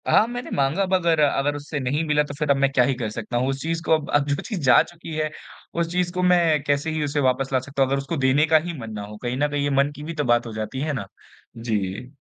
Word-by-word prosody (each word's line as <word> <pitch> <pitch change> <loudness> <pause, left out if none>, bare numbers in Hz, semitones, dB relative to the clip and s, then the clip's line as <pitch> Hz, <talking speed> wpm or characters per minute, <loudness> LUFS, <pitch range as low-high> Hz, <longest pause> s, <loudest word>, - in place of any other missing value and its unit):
हाँ, - - +5
मैंने 245 +1 -6
माँगा 140 +8 +1
अब 190 0 -2
अगर-अगर 150 -5 +2
उससे 145 +1 -5
नहीं 140 +4 -1
मिला 150 0 +3
तो 145 - -7
फिर 150 +1 -3
अब - - +5
मैं 135 0 +2
क्या 125 -2 +4
ही 135 - +1
कर 120 -3 -3
सकता 115 +2 -4
हूँ। 130 +2 +1
उस 135 0 -3
चीज़ 165 +2 -2
को - - -2
अब 155 -2 0
अब 145 -1 +3
जो 145 - +1
चीज़ 205 -7 -5
जा 125 - +7
चुकी 170 -1 -10
है, 155 0 -1 0.4
उस 170 0 -1
चीज़ 180 0 0
को 180 0 -1
मैं 170 -4 +4
कैसे 145 +2 0
ही 155 -1 -1
उसे 145 0 -1
वापस 135 0 +1
ला 130 - +4
सकता 135 +2 -4
हूँ, 135 - +3
अगर 140 - +1
उसको 140 +4 -3
देने 135 +2 +3
का 160 0 +6
ही 175 - -4
मन 115 -2 -7
ना 105 - -5
हो। 105 +1 -10
कहीं 120 +1 -2
न 145 +2 +2
कहीं 145 -1 -1
ये 145 - +1
मन 140 +1 +2
की 145 - -9
भी 165 +2 -5
तो 150 -2 -1
बात 120 -2 +2
हो 115 - -7
जाती 110 +5 -4
है 155 0 -1
ना? 115 -8 -4 0.5
जी। 110 +1 -3
145 Hz, 295 wpm, -23 LUFS, 130-160 Hz, 0.5 s, जा